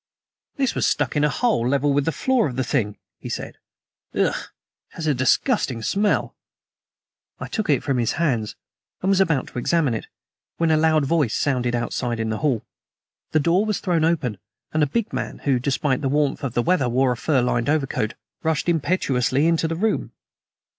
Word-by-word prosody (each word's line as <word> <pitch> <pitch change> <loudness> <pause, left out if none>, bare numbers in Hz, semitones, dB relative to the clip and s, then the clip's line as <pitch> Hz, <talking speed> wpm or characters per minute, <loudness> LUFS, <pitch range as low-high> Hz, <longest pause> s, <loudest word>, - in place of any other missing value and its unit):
"This 270 -3 +1
was - - +1
stuck - - 0
in 145 - +2
a 150 - +4
hole 215 - +1
level 140 +1 +2
with 140 0 +1
the 165 - +1
floor 250 - +1
of 125 - -5
the 130 - 0
thing," 105 -7 -1 0.2
he - - -7
said. - - -5 0.6
"Ugh! - - +2
it - - -12
has 165 - -5
a 150 - +3
disgusting 130 - +1
smell." 205 - +1 1.0
I - - -5
took 215 -5 -3
it 140 -4 +3
from 135 -3 0
his 115 - +1
hands, 125 -10 0 0.5
and 190 - +1
was 195 -1 +4
about 160 -8 +2
to - - -5
examine 150 -1 +1
it, 110 - -4 0.5
when 165 -1 +2
a - - +5
loud 155 -1 +3
voice 145 -6 +1
sounded 125 -4 0
outside 120 0 -2
in 110 0 -1
the 110 - -2
hall. 135 -7 0 0.6
The 155 - +2
door 170 +6 +3
was 215 -2 -1
thrown 175 -4 +1
open, 140 - 0 0.3
and 155 - +1
a 150 - +4
big 225 +10 -2
man, - - -3
who, 135 -3 +2
despite 135 +1 0
the 135 - 0
warmth 145 0 0
of 130 -4 -3
the 120 - +2
weather, 170 -7 +2
wore 130 +2 +2
a - - 0
fur 130 +1 +1
lined 120 +1 0
overcoat, 135 -8 0 0.3
rushed 160 -1 0
impetuously 145 -5 +1
into 165 -1 +2
the 165 - -2
room. 215 +6 -1
145 Hz, 195 wpm, -23 LUFS, 125-165 Hz, 1.0 s, a